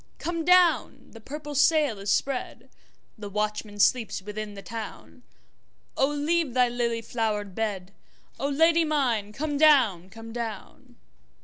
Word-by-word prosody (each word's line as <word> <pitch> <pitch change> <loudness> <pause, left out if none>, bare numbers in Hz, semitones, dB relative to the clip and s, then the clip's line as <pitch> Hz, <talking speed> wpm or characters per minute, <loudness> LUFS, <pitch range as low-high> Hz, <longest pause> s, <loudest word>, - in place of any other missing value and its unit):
Come 335 -1 -3
down! 360 0 +3
the 225 - -13
purple 295 +4 -7
sail 295 -5 +3
is 200 +1 -5
spread, 265 +5 -2 0.5
The 205 -1 -6
watchman 210 0 -3
sleeps 230 +1 +2
within 210 +1 -7
the 195 - -9
town,O 230 +4 -7
leave 295 -1 -1
thy 250 -1 +4
lily 235 -1 -2
flowered 215 -4 -2
bed,O 205 +5 -6
Lady 325 +3 +4
mine 250 -10 0
come 290 +4 -3
down, 240 - +4
come 225 +2 -11
down! 225 -4 -7
235 Hz, 125 wpm, -26 LUFS, 210-295 Hz, 0.5 s, thy